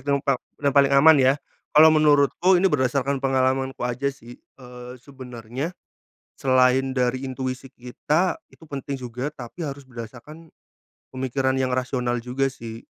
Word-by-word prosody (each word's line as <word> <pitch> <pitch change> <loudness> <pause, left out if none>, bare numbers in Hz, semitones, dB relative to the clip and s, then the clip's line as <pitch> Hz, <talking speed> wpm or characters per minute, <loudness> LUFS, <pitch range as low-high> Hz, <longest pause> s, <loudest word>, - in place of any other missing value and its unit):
dan 140 +1 0
pa 135 -3 +1 0.3
paling 140 0 +5
aman 140 +4 +7
ya. 130 +1 +5 0.4
Kalau 155 +1 +8
menurutku 155 +4 +4
ini 185 -1 +2
berdasarkan 135 0 0
pengalamanku 130 -1 0
aja 125 +3 -1
sih, 120 -3 -11
eee, 125 -1 -12
sebenarnya 130 +3 -8 0.6
selain 130 0 +2
dari 130 0 -1
intuisi 130 0 -5
kita 150 +8 -2
itu 160 - -18
penting 140 -1 -5
juga 125 +3 -5
tapi 135 +5 -9
harus 140 -2 -6
berdasarkan 130 +7 -11 0.6
pemikiran 130 0 -1
yang 130 - +1
rasional 125 -1 -1
juga 135 +2 -1
sih. 115 -3 -9
130 Hz, 135 wpm, -23 LUFS, 125-140 Hz, 0.6 s, Kalau